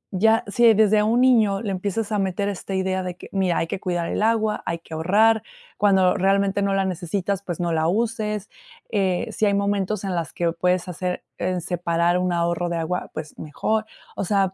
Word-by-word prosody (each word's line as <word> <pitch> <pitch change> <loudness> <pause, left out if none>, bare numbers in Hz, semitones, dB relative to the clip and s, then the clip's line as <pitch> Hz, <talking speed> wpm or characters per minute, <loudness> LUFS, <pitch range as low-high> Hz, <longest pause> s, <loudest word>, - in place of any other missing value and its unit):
ya 225 +5 +3
si 230 +3 +5
desde 215 0 +4
un 225 +3 +2
niño 220 -6 +4
le 205 - -2
empiezas 200 +3 -2
a 210 - +1
meter 195 +1 -1
esta 195 -1 -4
idea 190 0 0
de 180 -1 -5
que: - - -12
"Mira, 190 -3 +1
hay - - +1
que 165 - -4
cuidar 175 -3 -2
el - - -2
agua, 220 -1 +1
hay 170 - -1
que 165 -1 -13
ahorrar 210 +7 +3 0.4
cuando 190 -3 +4
realmente 195 +1 +1
no 200 0 +1
la 195 0 +1
necesitas, 190 +2 -2
pues, 175 -4 -5
no 175 -1 -1
la 160 0 +1
uses, 215 0 -1 0.4
eh, 190 -1 0
si 215 - +1
hay 200 - +2
momentos 200 0 -1
en 195 -2 -2
las 170 -4 -2
que 170 - -1
o - - -3
puedes 180 +1 0
hacer 180 +1 -3 0.2
en 180 0 -1
separar 175 0 0
un 180 0 0
ahorro 170 0 0
de 170 - -2
agua, 170 +2 -3
pues, 155 -1 -7
mejor". 215 +8 -1 0.3
O - - -2
sea, 195 0 +1
190 Hz, 210 wpm, -23 LUFS, 175-210 Hz, 0.4 s, si